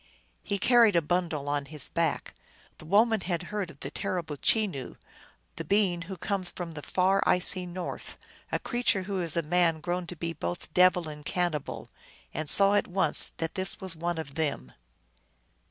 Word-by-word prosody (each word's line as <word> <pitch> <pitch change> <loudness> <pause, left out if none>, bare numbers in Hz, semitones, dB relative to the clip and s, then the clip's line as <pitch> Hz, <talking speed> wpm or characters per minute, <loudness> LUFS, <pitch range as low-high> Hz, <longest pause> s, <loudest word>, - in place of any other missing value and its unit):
He 200 - -2
carried 230 -1 +5
a 170 - +5
bundle 165 -3 -1
on 145 -1 -1
his 150 -1 -1
back. 170 -1 -1 0.5
The - - -11
woman 215 +5 +3
had 175 -1 -2
heard 200 -4 -2
of 140 - -15
the 140 - -5
terrible 165 -2 -3
Chenoo, 180 - 0 0.6
the - - -3
being 195 -4 +2
who 190 - -5
comes 190 -2 -1
from 175 -2 -6
the 155 -2 -7
far, 185 +6 +2
icy 180 0 +3
north, 175 0 -6 0.3
a - - +1
creature 240 -6 +1
who 195 0 -3
is 170 -1 -1
a 170 - +1
man 165 0 +2
grown 175 +2 -3
to 180 - -5
be 165 +1 -4
both 165 +1 -5
devil 180 -2 +4
and 150 -1 -8
cannibal, 170 -3 -2 0.5
and 155 -2 -3
saw 200 0 +5
at 205 - +2
once 190 +1 +2
that 165 0 -3
this 190 0 -3
was 190 -3 0
one 170 +1 -2
of 150 -3 -6
them. 145 - -2
175 Hz, 180 wpm, -28 LUFS, 160-190 Hz, 0.6 s, carried